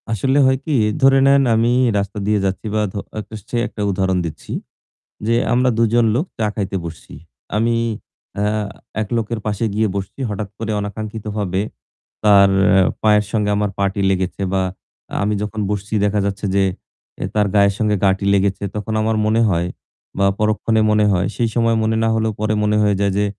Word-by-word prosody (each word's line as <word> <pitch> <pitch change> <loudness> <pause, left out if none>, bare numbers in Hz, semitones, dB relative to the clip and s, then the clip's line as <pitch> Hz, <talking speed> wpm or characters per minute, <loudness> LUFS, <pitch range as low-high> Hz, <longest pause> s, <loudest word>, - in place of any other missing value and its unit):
আসলে 130 +6 +1
হয় 130 0 +3
কি? 155 - 0 0.3
ধরে 135 0 +6
নেন 140 0 +5
আমি 115 +2 +2 0.3
রাস্তা 100 +1 -3
দিয়ে 105 -1 +2
যাচ্ছি 95 +3 -2
বা 110 - +2
ধ - - -14 0.2
একটা 110 +1 -8
সে 120 - -2
একটা 105 - -8
উদাহরণ 95 0 0
দিচ্ছি। 80 -3 -8 0.8
যে 115 - +2 0.2
আমরা 125 +1 +3
দুজন 115 +1 +3
লোক 140 +7 +1
চা 110 - +1
খাইতে 100 -2 -2
বসছি। 80 -1 -9 0.4
আমি, 115 +2 +2 0.6
আ - - +1 0.6
এক 105 - -6
লোকের 115 0 -2
পাশে 105 +1 -1
গিয়ে 110 +1 +1
বসছি। 95 +7 -6
হঠাৎ 105 0 -4
করে 110 -1 -3
অনাকাঙ্ক্ষিতভাবে 105 -2 -3 0.6
তার 100 -2 +6 0.5
পায়ের 105 -1 +4
সঙ্গে 105 -2 0
আমার 105 0 0
পা'টি 100 0 0
লেগেছে 95 0 -1
বা 95 - +2 0.5
আ - - -5
আমি 105 +1 +1
যখন 105 +1 -3
বসছি 105 +1 -4
দেখা 105 +1 +1
যাচ্ছে 100 +1 -3
যে 100 - +4 0.6
এ - - -1
তার 105 -1 +3
গায়ের 100 -1 +4
সঙ্গে 105 -1 +1
গা'টি 95 0 +2
লেগেছে। 100 0 +1
তখন 105 +1 -3
আমার 110 +1 +1
মনে 110 +2 +2
হয় 85 -1 0 0.5
বা 100 - +3
পরক্ষণে 110 +1 +1
মনে 105 0 +3
হয়, 90 -1 +1
সেই 115 -1 0
সময় 115 -1 +2
মনে 110 +1 +1
না - - +2
হলেও 110 0 0
পরে 110 0 0
মনে 105 0 +2
হয়ে 105 -1 +2
যায় 100 0 +2
যে, 105 - +2
105 Hz, 180 wpm, -19 LUFS, 100-110 Hz, 0.8 s, ধরে